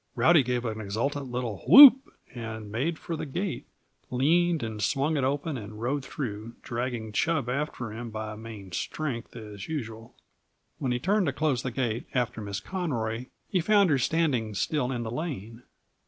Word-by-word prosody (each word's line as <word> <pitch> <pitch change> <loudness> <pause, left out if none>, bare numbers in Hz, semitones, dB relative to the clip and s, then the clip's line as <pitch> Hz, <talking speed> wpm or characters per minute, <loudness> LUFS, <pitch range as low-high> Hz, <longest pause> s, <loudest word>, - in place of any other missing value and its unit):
Rowdy 155 +6 +5
gave 125 -1 -1
an 110 -1 -3
exultant 130 +8 -2
little 120 -5 -3
whoop 270 -1 +10 0.2
and 110 -3 -6
made 145 +9 -1
for 170 - -5
the 155 - -5
gate, 180 +6 -3 0.4
leaned 165 +4 +2
and 110 -2 -4
swung 140 +8 +1
it 140 - 0
open 140 +1 -1
and 105 0 -9
rode 135 +4 -1
through, 115 -5 -5
dragging 120 -2 -3
Chub 155 +2 0
after 125 -4 -3
him 120 +1 -6
by 110 0 -5
main 105 -4 -9
strength, 120 - -4
as 105 -4 -8
usual. 115 -7 -6 0.6
When 130 -3 -1
he 125 - +1
turned 190 - +1
to 140 - 0
close 140 -3 0
the 130 - -3
gate 120 -1 -2
after 120 -3 -1
Miss 100 -1 -4
Conroy 125 -10 -3 0.2
he 185 - +1
found 200 -1 +4
her 140 - +3
standing 130 -8 0
still 125 +6 0
in 120 -2 -2
the 110 - -5
lane. 120 - -5
125 Hz, 170 wpm, -27 LUFS, 110-150 Hz, 0.6 s, whoop